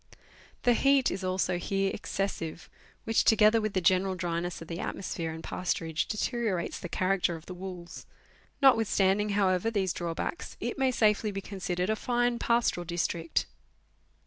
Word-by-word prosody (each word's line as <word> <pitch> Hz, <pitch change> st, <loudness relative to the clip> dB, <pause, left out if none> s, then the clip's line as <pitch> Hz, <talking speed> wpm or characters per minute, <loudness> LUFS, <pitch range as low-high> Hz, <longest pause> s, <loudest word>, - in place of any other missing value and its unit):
The 245 Hz, -, +5 dB
heat 275 Hz, +1 st, +3 dB
is 190 Hz, +1 st, -4 dB
also 185 Hz, -1 st, 0 dB
here 195 Hz, +1 st, 0 dB
excessive, 175 Hz, -4 st, -4 dB, 0.3 s
which, 225 Hz, -, +2 dB
together 220 Hz, 0 st, +5 dB
with 215 Hz, -1 st, -2 dB
the 185 Hz, -, +1 dB
general 185 Hz, +2 st, +3 dB
dryness 175 Hz, -1 st, -3 dB
of 165 Hz, -, -10 dB
the 170 Hz, 0 st, -5 dB
atmosphere 165 Hz, -4 st, -3 dB
and 160 Hz, 0 st, -8 dB
pasturage, 165 Hz, -3 st, -2 dB
deteriorates 215 Hz, -5 st, -1 dB
the 175 Hz, -, -6 dB
character 185 Hz, -1 st, +1 dB
of 160 Hz, 0 st, -11 dB
the 185 Hz, -, -7 dB
wools. 180 Hz, -1 st, -8 dB, 0.6 s
Notwithstanding, 210 Hz, -5 st, +4 dB
however, 185 Hz, +1 st, +2 dB
these 195 Hz, -5 st, 0 dB
draw 170 Hz, -1 st, -3 dB
backs, 345 Hz, -, -4 dB
it -, -, -3 dB
may 265 Hz, -1 st, +3 dB
safely 215 Hz, -3 st, +2 dB
be 195 Hz, -1 st, -4 dB
considered 185 Hz, -1 st, -2 dB
a -, -, +1 dB
fine 240 Hz, +1 st, 0 dB
pastoral 235 Hz, -6 st, +1 dB
district. 170 Hz, -1 st, -1 dB
190 Hz, 155 wpm, -29 LUFS, 175-215 Hz, 0.6 s, The